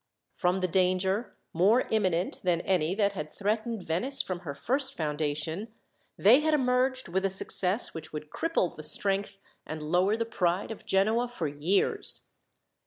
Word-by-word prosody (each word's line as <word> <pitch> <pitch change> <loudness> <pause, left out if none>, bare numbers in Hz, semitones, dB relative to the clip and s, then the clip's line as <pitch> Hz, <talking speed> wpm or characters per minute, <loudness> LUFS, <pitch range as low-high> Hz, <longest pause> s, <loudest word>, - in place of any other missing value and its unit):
From 180 +1 0
the 185 - +1
danger, 185 +4 0 0.2
more 200 +9 +4
imminent 185 -5 0
than 175 -2 +1
any 180 -2 0
that 200 -1 +1
had 155 -5 -5
threatened 215 +3 -3
Venice 245 - +1
from 185 -7 -2
her 155 -5 -7
first 265 - +2
foundation, 155 +4 -2 0.5
they 225 +7 +6
had 310 0 +2
emerged 255 -1 0
with 190 +2 -1
a 195 - +1
success 190 +2 +3
which 160 -1 -8
would 150 0 -8
cripple 330 - -1
the - - -8
strength, 195 +4 0 0.3
and 155 - -7
lower 190 +5 +2
the 230 - -1
pride 185 -2 -1
of 220 - -10
Genoa 220 +5 +2
for 235 -10 -4
years. 150 +7 -1
190 Hz, 160 wpm, -28 LUFS, 170-225 Hz, 0.5 s, they